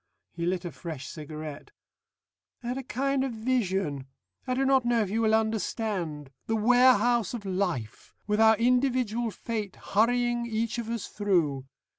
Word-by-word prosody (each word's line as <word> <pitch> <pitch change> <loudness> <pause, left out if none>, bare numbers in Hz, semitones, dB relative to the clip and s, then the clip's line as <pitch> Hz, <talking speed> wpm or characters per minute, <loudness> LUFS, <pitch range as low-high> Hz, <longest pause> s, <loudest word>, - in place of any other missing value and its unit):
He 170 0 -3
lit 180 0 -1
a 175 - -4
fresh 155 -7 -7
cigarette. 155 -1 -8 0.9
"I 240 - -4
had 250 - -2
a - - -3
kind 270 +1 -1
of 265 -3 -2
vision. 195 - -1 0.4
I 255 - 0
do 270 +1 +1
not 265 -1 +4
know 240 -1 +2
if 195 - -5
you 225 +2 +1
will 220 -1 +4
understand. 205 - -2 0.2
The 225 - +1
Warehouse 240 0 +4
of 215 -4 -7
Life, 180 - -3
with 210 +1 +1
our 220 0 +6
Individual 245 -1 +1
Fate 215 -2 -4
hurrying 240 +2 +1
each 230 +1 -1
of 230 -1 -5
us 230 -3 -3
through. 165 -10 0
220 Hz, 160 wpm, -28 LUFS, 180-240 Hz, 0.9 s, our